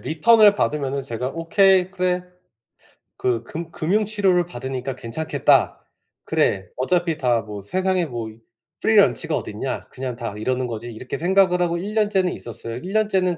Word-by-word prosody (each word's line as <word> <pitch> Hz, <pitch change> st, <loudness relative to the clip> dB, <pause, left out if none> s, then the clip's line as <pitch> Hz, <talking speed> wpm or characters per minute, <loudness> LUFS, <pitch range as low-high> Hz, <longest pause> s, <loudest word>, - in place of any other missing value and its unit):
리턴을 210 Hz, +5 st, +5 dB
받으면은 140 Hz, -7 st, -1 dB
제가 125 Hz, 0 st, -4 dB
'오케이 185 Hz, +3 st, +3 dB
그래 180 Hz, -1 st, -1 dB, 0.9 s
그 120 Hz, -2 st, 0 dB
금 165 Hz, +5 st, -7 dB
금융 200 Hz, +8 st, 0 dB
치료를 195 Hz, -4 st, +2 dB
받으니까 130 Hz, -3 st, -5 dB
괜찮겠다. 130 Hz, +7 st, +1 dB, 0.4 s
그래 95 Hz, -2 st, +1 dB
어차피 165 Hz, +4 st, 0 dB
다 120 Hz, -5 st, +1 dB
뭐 105 Hz, -1 st, -8 dB
세상에 185 Hz, -, 0 dB
뭐 120 Hz, -5 st, -5 dB
이 110 Hz, -, -14 dB, 0.5 s
free -, -, +3 dB
lunch가 -, -, +3 dB
어딨냐? -, -, -4 dB
그냥 130 Hz, -2 st, -5 dB
다 115 Hz, -4 st, -5 dB
이러는 130 Hz, +3 st, -1 dB
거지.' 120 Hz, +1 st, -6 dB
이렇게 125 Hz, +3 st, -6 dB
생각을 180 Hz, 0 st, +3 dB
하고 170 Hz, -1 st, +1 dB
1 200 Hz, +4 st, -5 dB
년째는 205 Hz, -4 st, +2 dB
있었어요. 115 Hz, 0 st, -8 dB
1 185 Hz, +9 st, -7 dB
년째는 190 Hz, -5 st, +1 dB
165 Hz, 360 characters per minute, -22 LUFS, 125-185 Hz, 0.9 s, 리턴을